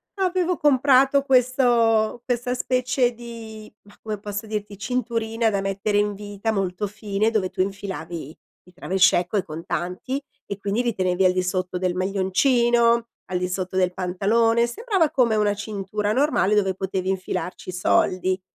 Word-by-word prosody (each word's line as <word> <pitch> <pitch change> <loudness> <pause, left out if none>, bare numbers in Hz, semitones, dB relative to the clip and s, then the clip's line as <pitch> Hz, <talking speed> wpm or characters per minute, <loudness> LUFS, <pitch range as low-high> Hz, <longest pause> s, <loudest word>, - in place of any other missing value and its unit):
avevo 365 -2 0
comprato 275 -1 +4
questo 240 -4 +3
questa 245 0 -1
specie 250 0 +1
di, 225 -2 -10
mah, 205 - -19
come 215 -2 -4
posso 205 +1 -5
dirti, 210 -1 -5
cinturina 230 0 -1
da 200 -2 -1
mettere 195 +1 -1
in 205 0 +1
vita, 205 +2 -4
molto 195 0 -2
fine, 210 +1 -1
dove 205 -5 0
tu - - -16
infilavi 175 -5 -5 0.3
i 180 - -20
travel 190 +2 -3
check 180 -1 +4
o - - +3
i 195 - +1
contanti, 180 - -4 0.2
e 200 - -5
quindi 200 +3 -1
li 240 -1 0
tenevi 185 0 +1
al 180 - +4
di 185 0 0
sotto 180 0 -2
del 180 -1 -1
maglioncino, 235 +5 +2 0.2
al 180 - -2
di 180 0 -2
sotto 185 0 -4
del 180 -1 +2
pantalone, 215 +6 +2
sembrava 390 - 0
come 240 -4 +2
una 210 -1 +2
cintura 205 0 -3
normale, 260 -7 +2
dove 195 -2 +2
potevi 190 0 -3
infilarci 185 -1 -4
soldi. 185 +1 +1
210 Hz, 160 wpm, -23 LUFS, 190-235 Hz, 0.3 s, comprato